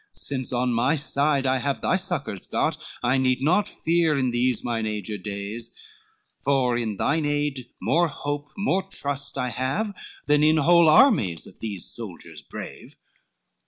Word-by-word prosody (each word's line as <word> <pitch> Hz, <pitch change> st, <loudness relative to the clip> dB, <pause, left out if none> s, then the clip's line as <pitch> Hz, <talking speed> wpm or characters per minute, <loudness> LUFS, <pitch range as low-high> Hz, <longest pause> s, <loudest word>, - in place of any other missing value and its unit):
Since 130 Hz, -3 st, -3 dB
on 125 Hz, 0 st, 0 dB
my 125 Hz, +7 st, +2 dB
side 140 Hz, -1 st, +1 dB
I 130 Hz, 0 st, +2 dB
have 140 Hz, +2 st, -2 dB
thy -, -, +2 dB
succors 170 Hz, -, -3 dB
got, -, -, 0 dB, 0.3 s
I 130 Hz, +2 st, +3 dB
need 130 Hz, -1 st, +2 dB
not 180 Hz, +7 st, +3 dB
fear 165 Hz, -2 st, +1 dB
in 130 Hz, -2 st, +1 dB
these 120 Hz, -1 st, +1 dB
my 120 Hz, -2 st, -1 dB
aged 105 Hz, -2 st, -3 dB
days, 105 Hz, +3 st, -6 dB, 0.6 s
For 130 Hz, -3 st, +2 dB
in 110 Hz, -4 st, -2 dB
thine 155 Hz, +3 st, +1 dB
aid 145 Hz, -4 st, -1 dB
more 170 Hz, +1 st, +2 dB
hope, 145 Hz, -1 st, -4 dB
more 195 Hz, -1 st, +1 dB
trust 145 Hz, -7 st, -3 dB
I 125 Hz, -, 0 dB
have, 135 Hz, -, -2 dB, 0.3 s
Than 150 Hz, 0 st, +3 dB
in 155 Hz, +1 st, +4 dB
whole 170 Hz, +2 st, +5 dB
armies 155 Hz, -, +4 dB
of -, -, -13 dB
these 100 Hz, -6 st, -4 dB
soldiers 85 Hz, -8 st, -7 dB
brave. -, -, -9 dB
135 Hz, 160 wpm, -25 LUFS, 120-155 Hz, 0.6 s, whole